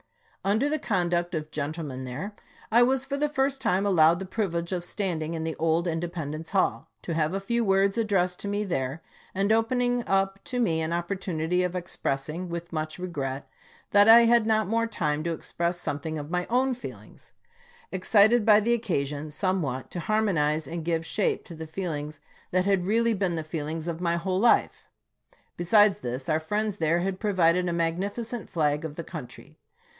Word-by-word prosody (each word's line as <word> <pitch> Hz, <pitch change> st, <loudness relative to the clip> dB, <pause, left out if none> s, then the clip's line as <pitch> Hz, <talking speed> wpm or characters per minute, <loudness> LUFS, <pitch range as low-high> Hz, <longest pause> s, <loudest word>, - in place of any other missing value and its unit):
Under 215 Hz, +8 st, +2 dB
the 305 Hz, +1 st, 0 dB
conduct 175 Hz, -5 st, 0 dB
of 155 Hz, 0 st, -4 dB
gentlemen 145 Hz, -3 st, -4 dB
there, 150 Hz, +12 st, -5 dB, 0.4 s
I 235 Hz, +2 st, +6 dB
was 260 Hz, +2 st, +3 dB
for 280 Hz, +1 st, -3 dB
the 295 Hz, +1 st, +1 dB
first 270 Hz, -1 st, 0 dB
time 190 Hz, +3 st, +1 dB
allowed 170 Hz, -4 st, +5 dB
the 190 Hz, -, -5 dB
privilege 175 Hz, -4 st, -2 dB
of 180 Hz, -2 st, -2 dB
standing 170 Hz, -4 st, -2 dB
in 160 Hz, -, -3 dB
the 160 Hz, -1 st, -3 dB
old 165 Hz, +1 st, +1 dB
Independence 165 Hz, -2 st, -4 dB
Hall, 195 Hz, -, 0 dB
to 170 Hz, -, -3 dB
have 160 Hz, +2 st, 0 dB
a -, -, 0 dB
few 235 Hz, +4 st, 0 dB
words 195 Hz, +1 st, +2 dB
addressed 185 Hz, -5 st, +1 dB
to -, -, -5 dB
me 205 Hz, +1 st, -1 dB
there, 145 Hz, -5 st, -3 dB, 0.3 s
and 200 Hz, +3 st, +2 dB
opening 245 Hz, +2 st, +1 dB
up 195 Hz, 0 st, +1 dB
to 250 Hz, -, -3 dB
me 165 Hz, -9 st, +1 dB
an 160 Hz, +1 st, -2 dB
opportunity 175 Hz, -1 st, -1 dB
of 180 Hz, 0 st, -1 dB
ex 175 Hz, -1 st, -4 dB
pressing, 155 Hz, +6 st, -3 dB
with 170 Hz, 0 st, -6 dB
much 155 Hz, 0 st, -3 dB
regret, 140 Hz, -7 st, -4 dB, 0.4 s
that 205 Hz, +1 st, +6 dB
I 230 Hz, +1 st, +10 dB
had 235 Hz, -1 st, +4 dB
not 220 Hz, -2 st, +2 dB
more 230 Hz, +2 st, +1 dB
time 155 Hz, -8 st, -1 dB
to 170 Hz, -, 0 dB
express 170 Hz, +2 st, -2 dB
something 155 Hz, 0 st, -3 dB
of 150 Hz, +1 st, -6 dB
my 180 Hz, 0 st, -1 dB
own 255 Hz, +2 st, +2 dB
feelings, 250 Hz, -, -11 dB, 0.6 s
excited 210 Hz, +4 st, +4 dB
by 210 Hz, -1 st, +6 dB
the 230 Hz, +3 st, +1 dB
occasion, 155 Hz, -10 st, -2 dB
somewhat 150 Hz, -6 st, -2 dB
to 175 Hz, -, -3 dB
harmonize 160 Hz, -7 st, +1 dB
and 165 Hz, +1 st, -5 dB
give 165 Hz, 0 st, -1 dB
shape 205 Hz, +4 st, 0 dB
to 170 Hz, -, -10 dB
the 160 Hz, 0 st, -7 dB
feelings 155 Hz, -4 st, -4 dB, 0.3 s
that 185 Hz, +1 st, +1 dB
had 195 Hz, -2 st, +1 dB
really 230 Hz, +2 st, +3 dB
been 190 Hz, -4 st, 0 dB
the 160 Hz, -, -3 dB
feelings 155 Hz, +1 st, -4 dB
of 170 Hz, 0 st, -4 dB
my 170 Hz, -1 st, +1 dB
whole 185 Hz, +2 st, -1 dB
life. 235 Hz, +3 st, +2 dB, 0.7 s
Besides 205 Hz, +3 st, +4 dB
this, 125 Hz, +2 st, -5 dB
our 155 Hz, 0 st, +2 dB
friends 210 Hz, +5 st, -2 dB
there 165 Hz, 0 st, +1 dB
had 190 Hz, +1 st, -2 dB
provided 180 Hz, -4 st, +2 dB
a -, -, -1 dB
mag 165 Hz, 0 st, 0 dB
nificent 225 Hz, +3 st, -4 dB
flag 150 Hz, -2 st, 0 dB
of 155 Hz, -2 st, -5 dB
the 170 Hz, -, -5 dB
country. 155 Hz, 0 st, -10 dB
180 Hz, 190 wpm, -27 LUFS, 160-205 Hz, 0.7 s, I